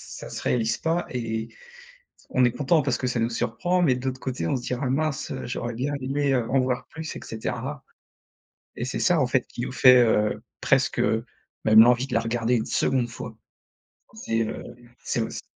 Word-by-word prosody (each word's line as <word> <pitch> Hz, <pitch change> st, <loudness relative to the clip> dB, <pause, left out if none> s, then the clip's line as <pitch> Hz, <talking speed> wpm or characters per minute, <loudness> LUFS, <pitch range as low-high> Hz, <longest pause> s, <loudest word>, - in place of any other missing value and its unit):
ça -, -, -8 dB
se -, -, -6 dB
réalise 115 Hz, -1 st, +1 dB
pas. 165 Hz, +2 st, -1 dB
Et 115 Hz, -2 st, -3 dB, 0.8 s
on 130 Hz, -, +3 dB
est 120 Hz, -, +4 dB
content 150 Hz, +5 st, +2 dB
parce 130 Hz, -3 st, 0 dB
que 130 Hz, -, -2 dB
ça 120 Hz, -2 st, 0 dB
nous 115 Hz, +1 st, 0 dB
surprend. 125 Hz, +11 st, 0 dB
Mais 135 Hz, -7 st, +4 dB
de 125 Hz, +1 st, -6 dB
l'autre 130 Hz, 0 st, -2 dB
côté, 125 Hz, -11 st, -3 dB
on -, -, +1 dB
se 120 Hz, -, -5 dB
dira: 125 Hz, +2 st, -3 dB
«Ah -, -, 0 dB
mince, 155 Hz, +1 st, -1 dB
heu, -, -, -5 dB
j'aurais 120 Hz, -1 st, -4 dB
bien 140 Hz, +5 st, -2 dB
aimé, 140 Hz, +1 st, 0 dB
heu, 120 Hz, -3 st, 0 dB
en 135 Hz, -, +3 dB
voir 125 Hz, -1 st, -1 dB
plus» 160 Hz, -1 st, -7 dB
et -, -, -6 dB
cetera. 130 Hz, +5 st, -5 dB, 0.9 s
Et 120 Hz, -, -3 dB
c'est 130 Hz, -, -3 dB
ça, 175 Hz, -4 st, +3 dB
en 130 Hz, -, +3 dB
fait, 125 Hz, 0 st, +1 dB
qui -, -, -9 dB
nous -, -, -3 dB
fait, 125 Hz, -1 st, +7 dB
heu, 105 Hz, -1 st, +1 dB, 0.2 s
presque, 135 Hz, -2 st, +2 dB
heu, 115 Hz, -1 st, +1 dB, 0.4 s
même 110 Hz, 0 st, +8 dB
l'envie 125 Hz, +2 st, +4 dB
de -, -, -5 dB
la -, -, +3 dB
regarder 115 Hz, +1 st, 0 dB
une 110 Hz, -, -2 dB
seconde 125 Hz, -3 st, +1 dB
fois. -, -, -8 dB, 0.8 s
C'est, 115 Hz, -, -1 dB
heu, 110 Hz, -, -3 dB, 0.4 s
c'est 120 Hz, -, -1 dB
aussi 110 Hz, -, -4 dB
125 Hz, 210 wpm, -25 LUFS, 115-135 Hz, 0.9 s, même